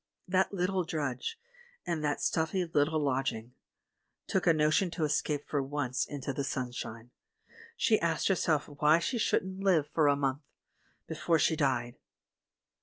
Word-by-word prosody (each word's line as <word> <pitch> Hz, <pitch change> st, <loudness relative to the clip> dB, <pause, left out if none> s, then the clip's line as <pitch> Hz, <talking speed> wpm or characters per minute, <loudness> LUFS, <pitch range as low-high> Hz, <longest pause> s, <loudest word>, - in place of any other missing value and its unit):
That 190 Hz, +1 st, +2 dB
little 185 Hz, -1 st, 0 dB
drudge, 155 Hz, -, -3 dB, 0.5 s
in 170 Hz, -3 st, -2 dB
that 150 Hz, -, 0 dB
little -, -, -10 dB
stuffy 175 Hz, +3 st, 0 dB
lodging, 135 Hz, -6 st, 0 dB, 0.7 s
took 190 Hz, -2 st, -1 dB
a 165 Hz, -, +7 dB
notion 155 Hz, +4 st, +2 dB
to 165 Hz, -1 st, -3 dB
escape 150 Hz, -1 st, -1 dB
for 145 Hz, -, 0 dB
once 135 Hz, -2 st, -2 dB
into 140 Hz, -1 st, -4 dB
the 140 Hz, -, -2 dB
sunshine; 125 Hz, -3 st, -5 dB, 0.7 s
she 220 Hz, -, +3 dB
asked 165 Hz, -2 st, 0 dB
herself 165 Hz, -6 st, +1 dB
why 150 Hz, +2 st, +3 dB
she 230 Hz, +8 st, -2 dB
shouldn't 190 Hz, -3 st, 0 dB
live 180 Hz, -7 st, +3 dB
for 155 Hz, -3 st, +3 dB
a 145 Hz, -, +4 dB
month 140 Hz, 0 st, -1 dB, 0.4 s
— -, -, -40 dB
before 165 Hz, -1 st, +1 dB
she 160 Hz, -, +2 dB
died 125 Hz, -6 st, -1 dB
150 Hz, 150 wpm, -30 LUFS, 140-170 Hz, 0.7 s, a